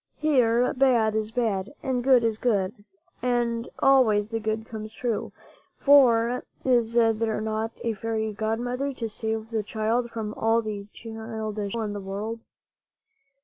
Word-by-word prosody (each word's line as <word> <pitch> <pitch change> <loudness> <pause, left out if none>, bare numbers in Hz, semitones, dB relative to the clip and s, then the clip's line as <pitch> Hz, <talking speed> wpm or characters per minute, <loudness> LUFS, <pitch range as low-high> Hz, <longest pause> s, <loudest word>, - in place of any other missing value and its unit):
Here 250 -5 +3
bad 245 -5 +3
is 215 0 -1
bad, 225 0 -1
and 255 -2 -1
good 255 -2 +5
is 225 -1 0
good, 205 -5 +1 0.5
and 240 -1 0
always 230 -7 +4
the 225 0 -2
good 220 0 -2
comes 220 -1 -7
true. 235 -3 -2 0.5
For 250 -4 +5 0.2
is 240 -3 +2
there 225 -2 +2
not 220 +1 -3
a 230 - 0
fairy 220 0 -2
godmother 245 +6 -2
to 230 -3 -4
save 220 +1 -3
the 220 -1 0
child 225 +3 -1
from 220 -2 -4
all 225 +1 +1
the 205 -2 -5
childish 220 -2 -5
evil 230 - -1
in 210 -1 -3
the 205 - -4
world? 205 +4 -4
225 Hz, 145 wpm, -26 LUFS, 215-240 Hz, 0.5 s, good